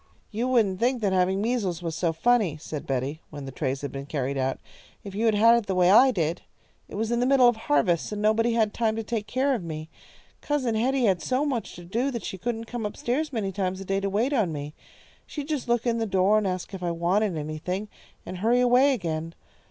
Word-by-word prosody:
"You 230 +3 -1
wouldn't 215 -7 +2
think 250 +1 +1
that 195 -2 +2
having 190 +2 +2
measles 205 -8 -1
was 165 -2 -3
so 170 0 0
funny," 195 -1 +2
said 150 -1 -7
Betty, 135 +4 -2
when 145 -2 -8
the 135 - -6
trays 135 0 -2
had 140 - -4
been 140 0 -7
carried 140 -2 -2
out, 135 0 -1 0.5
"if 200 - -8
you 220 +3 0
had 220 - +3
had 230 +3 +6
it 235 -3 0
the 190 - -1
way 180 0 +4
I 255 +6 +7
did. 170 -7 -1 0.5
It - - -8
was 220 +2 -1
in 235 - +1
the 250 - +2
middle 265 -2 +6
of 240 - +4
harvest, 170 -4 +1
so 210 - -5
nobody 220 +3 +2
had 220 -2 +1
time 225 -2 0
to 225 - -3
take 215 -2 -3
care 265 +5 +1
of 230 -8 -2
me. 155 -1 -6 0.5
Cousin 275 -6 0
Hetty 255 +4 +1
had 185 -5 +2
so 260 +3 0
much 255 -6 -3
to 175 - -11
do 235 +10 -1
that 235 -4 -5
she 190 - -5
couldn't 230 +3 -3
come 240 0 -5
up 210 - -4
stairs 290 +6 -1
many 215 -6 -2
times 190 -1 -2
a 195 - -7
day 195 +1 0
to 195 0 -2
wait 225 +8 0
on 215 -10 +1
me. 145 0 -6 0.5
She'd 290 -2 -6
just 300 -6 -3
look 240 0 +1
in 230 -1 +1
the 225 - -1
door 195 +2 +3
and 205 - -1
ask 185 +1 -4
if 190 - -6
I 175 - -1
wanted 175 +3 0
anything, 155 +7 -4 0.4
and 185 - -6
hurry 235 +5 +3
away 250 +3 +4
again. 165 -5 -4
205 Hz, 245 wpm, -26 LUFS, 170-235 Hz, 0.5 s, I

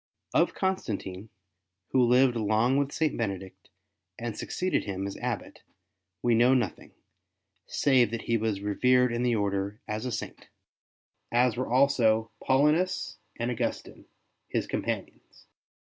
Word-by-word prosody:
Of - - +2
Const 190 -7 -1
antine, 95 0 -5 0.6
who 130 - +4
lived 125 +1 +4
long 110 +3 +2
with 140 0 0
St. 155 -2 0
Benedict 95 -4 -5 0.5
and 115 -2 -4
succeeded 185 0 -1
him 95 0 -3
as 100 - -5
Abbot, - - -4 0.6
we 120 - +3
know 120 +3 +5
nothing 125 - -2 0.7
save 130 -4 +3
that 115 0 -4
he 115 - 0
was 110 -3 -1
revered 125 +4 +3
in 120 - -1
the 120 -1 +2
Order 100 0 -1
as 110 +3 -3
a - - -3
Saint, - - -6 0.8
as 120 -1 +3
were 125 0 -3
also 115 -4 +3
Paulinus 150 +8 +2 0.2
and 120 +1 -1
Augustine, 120 - -4 0.4
his - - -1
companions. - - -5
120 Hz, 135 wpm, -28 LUFS, 110-130 Hz, 0.8 s, know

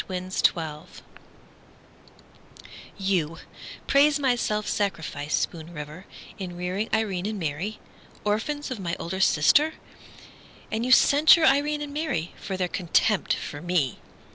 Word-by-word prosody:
Constance 185 0 -3
Hately 155 -2 -6 2.1
You 180 -5 0 0.5
praise 285 +1 +4
my 270 -3 +2
self 210 -3 -2
sacrifice, 155 -7 -2
Spoon 165 0 -3
River, 150 +3 -9 0.3
In 180 -2 -6
rearing 185 +5 -2
Irene 205 -4 0
and 215 0 -3
Mary, 170 +7 -3 0.4
Orphans 260 +8 -2
of 250 - -4
my 170 -2 -3
older 190 +3 -4
sister! 280 - +4 1.0
And 220 +1 -1
you 255 - -1
censure 305 +5 +6
Irene 295 +1 +2
and 285 -1 -7
Mary 285 - -2
For 190 - -4
their 180 -1 0
contempt 185 +3 +1
for 145 - -7
me! 175 -7 0
190 Hz, 125 wpm, -25 LUFS, 170-255 Hz, 2.1 s, censure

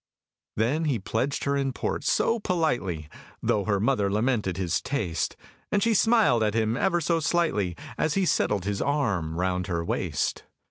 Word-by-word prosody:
Then 135 +9 +1
he 140 -6 +1
pledged 115 +7 -2
her 140 0 +1
in 135 -1 0
port, - - -3
so 230 0 +2
politely 120 - -1 0.4
(Tho' 100 -2 +1
her 100 -2 +1
mother 105 -2 +1
lamented 105 -4 0
his 90 -3 0
taste), 90 - -2 0.4
And 205 - +2
she 230 - +3
smiled 215 - +4
at 105 0 +1
him 110 0 +1
ever 175 +5 +1
so 165 +1 +1
slightly, 145 - 0 0.2
As 155 - +1
he 195 -1 +2
settled 105 - +1
his 100 -1 -1
arm 105 - 0
round 90 +1 -1
her 85 -2 -2
waist. - - -1
115 Hz, 170 wpm, -26 LUFS, 95-155 Hz, 0.4 s, smiled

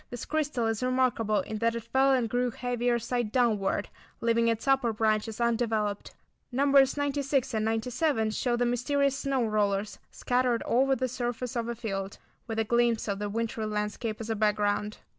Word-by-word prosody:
This 245 - -6
crystal 295 -6 -1
is 225 -1 -1
remarkable 250 -4 +1
in 220 - -5
that 230 +1 +1
it 230 - -4
fell 265 +3 +2
and 250 -3 +2
grew 245 +2 0
heavier 245 0 -1
side 240 -1 -2
downward, 215 -5 +1 0.3
leaving 230 0 +2
its 230 +3 -1
upper 270 -3 +3
branches 215 0 0
undeveloped. 225 -3 -1 0.4
Nos. 275 +1 +4
96 280 -2 0
and 215 -1 0
97 225 +1 0
show 240 +3 0
the 245 - +1
mysterious 270 +3 +1
"snow 270 -3 0
rollers" 205 -1 0
scattered 245 -1 0
over 270 +3 +3
the 255 +1 -1
surface 245 0 -4
of 235 -1 -1
a 235 - -3
field, 195 -3 -4 0.3
with 225 -1 -4
a 225 - +2
glimpse 235 0 +1
of 200 -1 -2
the 205 0 -3
wintery 225 0 -2
landscape 210 +1 -3
as 225 0 -4
a - - 0
background. 210 0 0
235 Hz, 175 wpm, -28 LUFS, 215-255 Hz, 0.4 s, Nos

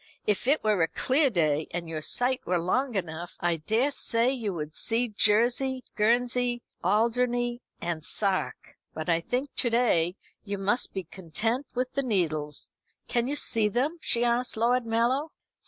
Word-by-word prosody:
"If 210 +3 0
it 290 +3 +3
were 210 -4 +2
a 165 - +4
clear 275 - +2
day, 155 - +1
and 170 -1 -5
your 160 -1 -4
sight 250 +10 +1
were 180 +1 0
long 240 +9 0
enough, 175 -2 -4
I 175 -1 0
daresay 235 - +1
you 235 -6 -3
would 155 -3 -6
see 235 +1 +2
Jersey, 240 +5 +2
Guernsey, 240 +2 +1 0.2
Alderney, 240 +4 +1 0.2
and 170 -2 -3
Sark. 195 +2 -2 0.2
But, 155 +2 -4
I 165 -1 +3
think, 250 +10 -3
to 240 - +4
day 185 -8 +2 0.3
you 200 -1 -4
must 200 +5 0
be 190 - -2
content 205 - -3
with 255 +1 -1
the 275 - 0
Needles. 160 - 0 0.4
Can 240 0 0
you 285 - -1
see 225 -6 +2
them?" 270 - -1
she 235 +1 +3
asked 240 0 0
Lord 240 +1 +2
Mallow. 245 +7 +1
230 Hz, 160 wpm, -27 LUFS, 175-250 Hz, 0.4 s, a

